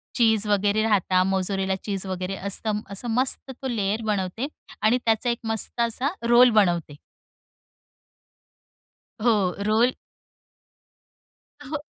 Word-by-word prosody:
चीज 220 -3 +3
वगैरे 205 +1 +2
राहतात 190 -4 +2
मोझरेला 190 0 0
चीज 195 -2 -3
वगैरे 185 0 -3
असतं. 205 +2 -2
असं 200 +5 -4
मस्त 255 +3 -1
तो 265 - -3
लेयर 215 -3 -1
बनवते 210 +4 -2 0.3
आणि 215 +4 +3
त्याचा 225 +1 +1
एक 235 - 0
मस्त 225 +1 -1
असा 235 +4 0 0.2
रोल 245 +1 +7
बनवते. 175 -9 +1 2.3
हो, 210 -6 +2
रोल. 230 +4 +3 1.7
अ, - - -11
हो, 300 +3 -3
215 Hz, 115 wpm, -24 LUFS, 195-235 Hz, 2.3 s, रोल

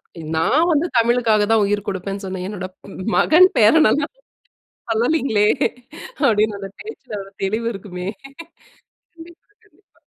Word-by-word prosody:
அதுதான். 160 -2 -10
நான் 300 - +2
வந்து 310 +2 +1
தமிழுக்காக 230 -2 +2
தான் 220 -2 +4
உயிர் 205 0 -1
குடுப்பேன்னு 195 +1 -4
சொன்னேன். 185 -1 -5
என்னுடைய 185 -3 -6
ப் 190 0 -9
மகன் 365 +4 +6
பேரன்னல்லா 290 +5 +4 0.8
சொல்லலீங்களே, 225 -3 +1 0.8
அப்படின்னு 215 -4 +2
அந்த 195 - -6
பேச்சில 260 - -8
ஒரு 195 - -14
தெளிவு 220 +4 -1
இருக்குமே. 185 -2 -7 1.1
கண்டிப்பா 340 +4 -16
கண்டிப்பா. 410 -1 -32
215 Hz, 125 wpm, -20 LUFS, 195-285 Hz, 1.1 s, மகன்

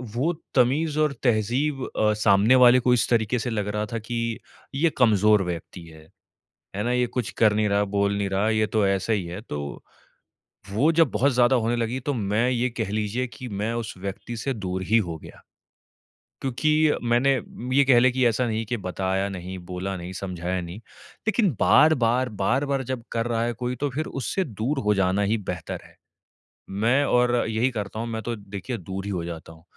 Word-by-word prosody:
वो 160 +8 +1 0.2
तमीज़ 145 +5 +2
और 150 -2 +2
तहज़ीब 125 +5 +1
अ, 105 0 +3
सामने 105 +3 +4
वाले 125 0 +7
को 125 0 +2
इस 115 -4 +1
तरीके 115 +1 +1
से 125 - -3
लग 105 -3 -2
रहा 105 0 -1
था 115 - -1
कि 115 0 -3 0.4
ये 160 +4 +3
कमजोर 105 -4 +4
व्यक्ति 90 0 -6
है, 80 -1 -15 0.7
है 105 - -1
ना? 120 - 0
ये 125 0 +2
कुछ 120 -2 -3
कर 110 -2 +5
नहीं 105 0 +1
रहा, 100 0 +2
बोल 100 0 0
नहीं 100 -1 -1
रहा, 100 +3 +1
ये 110 -1 +2
तो 105 -2 +1
ऐसा 95 +3 0
ही 100 -4 0
है। 90 +4 -6
तो 75 - -6 0.9
वो 140 +10 +3
जब 165 -4 +3
बहुत 130 +6 +2
ज़्यादा 125 +1 +4
होने 120 +1 0
लगी 120 +3 -2
तो 145 +2 -2
मैं 110 +2 0
ये 125 0 +1
कह 110 -4 -4
लीजिए 110 +4 -1
कि 125 +1 -9
मैं 105 +2 -2
उस 115 -2 -4
व्यक्ति 100 +5 -6
से 135 +4 -2
दूर 95 -3 -4
ही 110 +5 +3
हो 85 -1 -5
गया। - - -13 1.0
क्योंकि 155 +4 +2
मैंने 120 +4 +3 0.4
ये 140 - +7
कह 125 -3 +6
लें 130 +1 +4
कि 130 -1 +2
ऐसा 120 +2 +1
नहीं 110 0 -2
कि 120 +2 -2
बताया 95 0 -2
नहीं, 95 0 -6
बोला 90 +2 -5
नहीं, 90 +2 -7
समझाया 90 -1 -3
नहीं। 85 +3 -8 0.5
लेकिन 210 -4 +2
बार-बार, 130 -5 +4
बार-बार 135 +7 0
जब 125 -2 -4
कर 115 0 -1
रहा 115 -1 0
है 120 0 -1
कोई 125 +2 -3
तो 145 +3 -2
फिर 155 +5 -3 0.2
उससे 190 +9 -1
दूर 125 +4 -2
हो 105 - +5
जाना 95 +1 +1
ही - - +2
बेहतर - - -5
है। - - -19 0.7
मैं 115 +8 +2
और 125 -1 +3
यही 115 +4 +1
करता 105 -1 -5
हूँ 115 - -3
मैं 110 -1 -4
तो 120 0 -3
देखिए 100 +4 -6
दूर 95 +2 -6
ही 100 - -3
हो 90 -3 -2
जाता 80 -1 -8
हूँ। 80 0 -19
115 Hz, 200 wpm, -24 LUFS, 100-125 Hz, 1.0 s, वाले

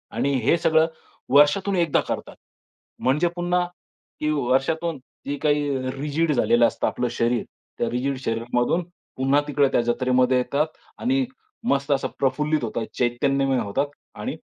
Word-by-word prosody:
आणि 140 - +1
हे 155 +7 +4
सगळं 160 -1 +3 0.4
वर्षातून 150 +8 +4
एकदा 170 -4 +2
करतात. - - -4 0.6
म्हणजे 150 +7 +2
पुन्हा 175 0 +1 0.5
की 150 - 0
वर्षातून 145 +4 0 0.3
जे 145 0 -2
काही 145 -3 +1
रिजिड 150 +2 0
झालेलं 120 -2 +4
असतं - - -2
आपलं 125 - -1
शरीर, 120 -1 0 0.3
त्या 120 - 0
रिजिड 130 +3 -1
शरीरामधून 120 +8 0 0.3
पुन्हा 135 +2 +3
तिकडे 145 -1 +3
त्या - - +3
जत्रेमध्ये 125 +1 +2
येतात 140 +4 +1 0.3
आणि 265 +2 +1 0.4
मस्त 140 +1 +1
असं 135 -1 +2
प्रफुल्लित 150 +2 +1
होतात, 115 0 -2
चैतन्यमय 135 +2 +1
होतात 105 +8 -1 0.3
आणि - - -4
140 Hz, 135 wpm, -24 LUFS, 125-155 Hz, 0.6 s, हे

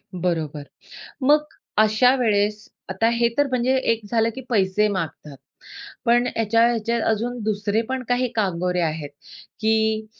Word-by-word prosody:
बरोबर. 160 -4 -2 0.6
मग 295 +3 +4 0.3
अशावेळेस 215 -2 +2 0.2
आता 190 +4 +1
हे 235 0 +2
तर 290 0 +3
म्हणजे 255 0 +1 0.2
एक 230 0 -1
झालं 225 -1 +2
की 265 - -6
पैसे 210 -2 +2
मागतात. 165 -7 -5 0.7
पण 240 0 +3
याच्या 230 +1 +3
याच्यात 235 0 -1
अजून 235 +3 -1
दुसरे 210 +1 0
पण 260 -1 -2
काही 250 0 +1
कांगोरे 180 -3 0
आहेत 155 -3 -3 0.5
की 220 0 +1
220 Hz, 130 wpm, -22 LUFS, 190-240 Hz, 0.7 s, मग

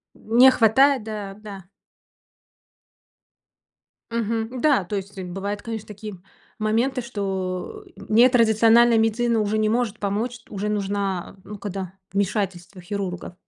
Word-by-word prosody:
Не 240 +4 +5
хватает, 260 +3 +4
да, 210 -3 -6
да. 200 -3 -10 2.5
Мгм, 230 +2 -2
Да, 285 -10 +3
то 205 +4 -4
есть, 200 +1 -6
э, 185 - -4
бывают, 200 +3 -4
конечно, 225 -2 -6
такие 210 0 -8 0.4
моменты, 230 +5 0
что 195 - -4
нетрадициональная 230 0 +4
медицина 225 +1 +1
уже 210 +1 0
не 215 0 +2
может 225 -1 0
помочь, 220 +5 -2
уже 205 +1 -4
нужна, 200 -3 -2
э, - - -21
ну, 210 0 -9
когда 195 -2 -5 0.2
вмешательство 195 -2 -2
хирургов. 180 -1 -5
215 Hz, 120 wpm, -23 LUFS, 195-230 Hz, 2.5 s, Не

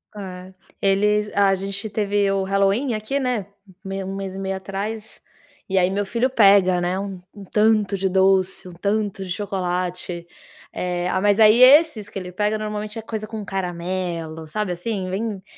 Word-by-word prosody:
É, 185 -2 -8 0.3
eles 210 +2 +2
a 200 -1 +4
gente 200 +2 -5
teve 205 -1 +1
o 195 0 0
Halloween 195 +6 +1
aqui, 215 +6 -2
né, 250 -7 -1 0.2
hum, 190 - -17
meio 195 -1 -4
1 195 - -4
mês 195 -1 -5
e - - -6
meio 195 0 -2
atrás, 205 +3 -6 0.5
e 190 - 0
aí 180 -1 +4
meu 200 +1 -1
filho 235 +6 0
pega, 195 -6 +5
né, 175 +1 -1
um 195 -2 -5
um 205 - -10
tanto 210 0 +2
de 190 0 0
doce, 190 0 +2
um - - -11
tanto 200 +2 -1
de - - -9
chocolate, 180 -2 -3 0.5
eh, 180 0 -2
ah, 185 - 0
mas 205 +2 +2
aí 215 +3 +7
esses 265 -5 +6
que - - -8
ele 180 -1 -6
pega 210 +3 0
normalmente 210 0 -4
é - - -4
coisa 220 -1 -5
com 220 -1 -6
caramelo, 175 -3 -4
sabe, 210 +4 -2
assim, 185 +1 -3
bem 200 0 -3
195 Hz, 180 wpm, -22 LUFS, 185-210 Hz, 0.5 s, aí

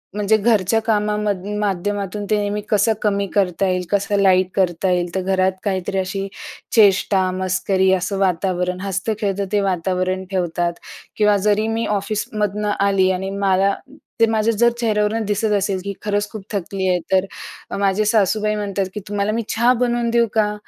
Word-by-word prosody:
म्हणजे 210 +1 +2
घरच्या 215 -1 +2
कामामधून 210 -2 -1
माध्यमातून 205 0 -2
ते 215 - +3
नेहमी 205 0 -2
कसं 210 +1 +3
कमी 200 -1 +1
करता 195 -1 +1
येईल, 180 -1 0
कसं 200 0 +1
लाईट 185 -2 +4
करता 185 0 +1
येईल, 175 -1 -1
तर 190 - 0
घरात 190 0 +1
काहीतरी 195 -1 -2
अशी 195 +1 -3 0.5
चेष्टा-मस्करी 190 -2 +2
असं 190 +2 -1
वातावरण, 180 -1 0
हसतं-खेळतं 200 +1 -2
ते 205 - +2
वातावरण 185 0 -1
ठेवतात. 175 -2 -1 0.4
किंवा 210 -1 +4
जरी 210 +1 +2
मी 225 +1 -1
ऑफिसमधून 210 0 -2
आली 195 -1 +3
आणि 190 +1 -2
मला 195 0 +2 0.5
ते 230 - +6
माझ्या 225 0 +1
जर 235 +2 +5
चेहऱ्यावरून 220 -1 +1
दिसत 210 +1 0
असेल, 195 -1 -1
की 200 0 -4
खरंच 205 0 -1
खूप 215 -2 -8
थकली 195 -1 -2
आहे, 180 -1 +2
तर 190 0 +3 0.5
माझ्या 200 +1 +1
सासूबाई 215 0 +2
म्हणतात 200 -2 -2
की, 210 - -4
"तुम्हाला 205 0 -1
मी 230 +2 -1
चहा 235 +2 +3
बनवून 240 -1 +1
देऊ 235 0 +3
का? 210 -2 +2
200 Hz, 155 wpm, -20 LUFS, 190-210 Hz, 0.5 s, ते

